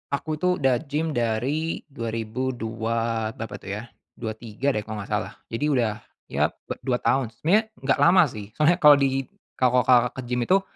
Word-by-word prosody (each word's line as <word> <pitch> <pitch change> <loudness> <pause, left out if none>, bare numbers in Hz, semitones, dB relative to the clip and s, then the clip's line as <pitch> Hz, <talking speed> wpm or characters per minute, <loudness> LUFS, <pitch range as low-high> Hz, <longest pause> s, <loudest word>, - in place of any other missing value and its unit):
Aku 155 +1 -4
itu 180 +1 +2
udah 135 -6 +2
gym 155 +3 -1
dari 130 +7 -1
2002 115 -1 -2
berapa 115 -5 -6
tuh 100 - -5
ya, 105 - -6 0.3
23 115 +3 -3
deh 110 - -1
kalau 105 -1 -6
gak 105 - -12
salah. 105 0 -1 0.2
Jadi 115 +6 -1
udah 120 -8 +1 0.3
ya - - +2 0.3
2 125 - 0
tahun. 130 +1 +1
Sebenarnya 185 - +3 0.2
gak 135 0 +2
lama 175 +5 +6
sih. 105 +1 -9
Soalnya 160 +4 +3
kalau 150 -3 +9
di 135 -2 0 0.3
kalau, 125 0 +4
Kakak, 125 0 +4
ke 130 - -4
gym 120 0 -1
itu, 195 +1 +4
125 Hz, 175 wpm, -25 LUFS, 115-145 Hz, 0.3 s, kalau